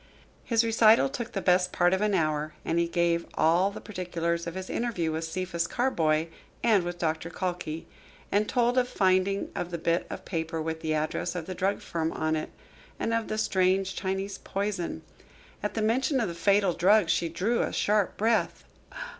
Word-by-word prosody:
His 230 -1 +2
recital 225 +2 +5
took 240 -4 -5
the 195 - -3
best 180 0 +3
part 175 0 +3
of 190 - +1
an 210 -1 +2
hour, 155 -2 0
and 165 - +1
he 170 - +2
gave 170 0 +1
all 175 +4 +3
the 200 - -8
particulars 170 -4 -3
of 170 - -5
his 190 0 -5
interview 200 -9 -1
with 160 +1 -2
Cephas 170 0 -2
Carboy 160 -11 +1 0.4
and 215 -6 +4
with 175 0 -4
Doctor 160 -1 -2
Calkey, 175 -3 -4 0.5
and 210 +1 +2
told 245 0 +2
of 250 - +1
the - - -16
finding 190 +1 +2
of 175 - -3
the 170 - -3
bit 170 +1 0
of - - -7
paper 165 -2 -3
with 160 0 -3
the 155 -1 0
address 155 +3 -2
of 170 -3 -4
the 185 - -5
drug 190 +2 -1
firm 165 -1 -2
on 155 0 0
it, 155 - -3 0.5
and 230 - -1
of 230 -1 0
the 215 - -3
strange 190 -2 +1
Chinese 195 +1 -3
poison. 195 -3 -3 0.6
At 210 - -3
the 220 - 0
mention 260 +5 +2
of 230 - 0
the - - -4
fatal 195 +2 +3
drug 195 +3 +4
she 165 0 +1
drew 200 +9 0
a - - -1
sharp 205 -2 +1
breath. 225 +1 +1
185 Hz, 195 wpm, -28 LUFS, 170-210 Hz, 0.6 s, recital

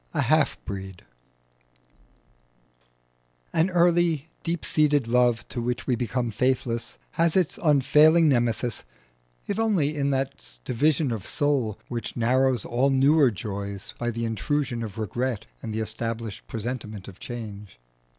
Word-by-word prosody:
IX. - - -24
A - - +2
HALF - - +2
BREED 95 -2 -7 2.5
An 165 +4 +3
early 170 -3 +2
deep 170 -1 -3
seated 145 -5 +2
love 120 -1 +2
to 120 - -4
which 120 +1 -2
we 125 - +1
become 120 0 -2
faithless 120 0 -1
has 165 -1 +2
its 185 +4 +1
unfailing 150 +2 +5
Nemesis, 120 -3 +1 0.6
if 205 - -2
only 180 -10 +1
in 140 -1 0
that 135 - -3
division 145 +2 +1
of 110 -5 -4
soul 135 -8 0
which 120 0 -5
narrows 125 0 +2
all 125 +3 +2
newer 140 +1 +5
joys 100 -2 -6
by 120 - -1
the 115 0 -2
intrusion 120 +3 -1
of 110 -3 -6
regret 115 +2 -2 0.2
and 110 - -5
the 110 +1 -2
established 115 -1 -4
presentiment 110 -4 -5
of 95 - -11
change. 105 - -8
125 Hz, 135 wpm, -25 LUFS, 110-145 Hz, 2.5 s, unfailing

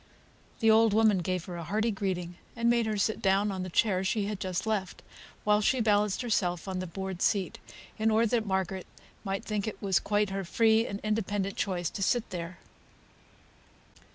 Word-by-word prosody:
The 225 -1 +5
old 220 -1 +5
woman 215 -3 +4
gave 180 0 -2
her 175 -2 -6
a 170 - -5
hearty 220 +7 0
greeting, 185 -4 -3 0.2
and 235 +1 +2
made 235 -2 +2
her 215 -1 -1
sit 215 +2 0
down 195 +1 +2
on 190 -1 -4
the 185 - -4
chair 190 +1 +2
she 200 +2 0
had 205 -1 -4
just 185 +1 -2
left, 210 -4 -2 0.4
while 210 0 +3
she 255 +5 +2
balanced 210 -1 +2
herself 180 -8 0
on 185 -1 -3
the 185 - -4
board 190 +1 -5
seat, 195 -4 0 0.4
in 220 +1 +3
order 220 +1 +3
that 225 -2 0
Margaret 190 -1 -2 0.4
might 195 -1 -3
think 210 -1 -2
it 215 - -5
was 195 -2 +2
quite 205 -1 0
her 195 0 -2
free 220 +4 +3
and 200 - -5
independent 205 -2 -1
choice 180 -4 -1
to 200 - -6
sit 230 +4 +1
there. 175 0 -5
200 Hz, 190 wpm, -29 LUFS, 185-220 Hz, 0.4 s, The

